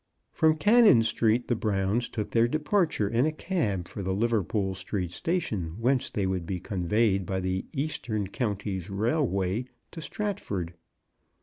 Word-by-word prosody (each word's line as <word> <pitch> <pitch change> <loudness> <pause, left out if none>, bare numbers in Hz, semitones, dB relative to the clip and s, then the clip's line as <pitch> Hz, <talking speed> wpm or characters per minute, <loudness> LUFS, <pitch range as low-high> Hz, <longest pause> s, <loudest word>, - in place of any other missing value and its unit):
From 160 0 +3
Cannon 210 - +6
Street 115 +1 +1
the 120 - +1
Browns 105 +2 0
took 105 -3 -4
their 115 0 +4
departure 155 - +1
in 120 +7 +2
a - - +1
cab 130 - -2
for 100 - -6
the 95 0 -1
Liverpool 105 -3 0
Street 95 -2 -4
Sta 170 - 0
tion, 90 - -3
whence 130 +2 +1
they 100 - -1
would 95 -3 -2
be 95 0 -2
conveyed 100 +2 +1
by 95 +1 -2
the 95 0 -2
Eastern 125 -8 -2
Counties 100 -3 -3
Railway 105 - 0 0.3
to 165 - -8
Stratford. 140 - -3
110 Hz, 150 wpm, -28 LUFS, 95-135 Hz, 0.3 s, Cannon